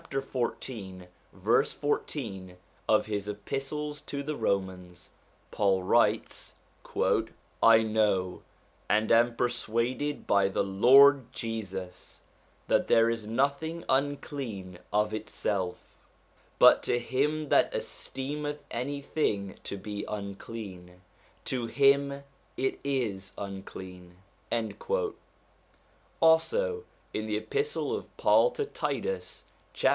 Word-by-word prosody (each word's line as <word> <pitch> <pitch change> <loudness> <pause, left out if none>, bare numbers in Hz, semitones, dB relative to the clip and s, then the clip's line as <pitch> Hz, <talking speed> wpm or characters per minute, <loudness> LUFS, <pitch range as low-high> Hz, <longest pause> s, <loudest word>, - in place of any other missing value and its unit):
14 120 -8 -4 0.2
verse 110 +8 +2
14 100 -11 -3 0.3
of - - +4
his 105 -2 -3
Epistle 135 +8 -4
to 145 -1 -6
the 150 +1 -3
Romans, 90 -5 -3 0.4
Paul 95 -3 +2
writes: - - +1 0.2
' - - -21 0.7
I 115 0 +7
know, 105 -4 +1 0.5
and 105 +2 +2
am 115 +1 +5
persuaded 120 +4 -1
by 100 -1 +4
the 95 - 0
Lord 130 +6 +6
Jesus, 100 -7 -6 0.5
that - - +2
there 115 0 +5
is 115 -2 -4
nothing 140 +8 -1
unclean 130 - -2
of 105 +1 +1
itself: 100 -3 -3 0.6
but - - +8
to - - +1
him 145 +5 0
that - - +4
esteemeth 145 +2 -4
any 140 +4 -3
thing 100 -10 -1
to 100 - -4
be 105 +1 -5
unclean, 100 -3 -7 0.5
to 125 -3 -2
him 140 +2 +3 0.3
it 130 - -1
is 115 -9 -2
unclean.' 95 -2 -8 2.0
Also 445 - +3 0.3
in 110 0 -2
the 105 -1 0
Epistle 430 - -1
of - - -8
Paul - - +5
to 440 - -2
Titus, 480 +3 -3 0.3
chap. - - +3
115 Hz, 105 wpm, -29 LUFS, 100-140 Hz, 2.0 s, but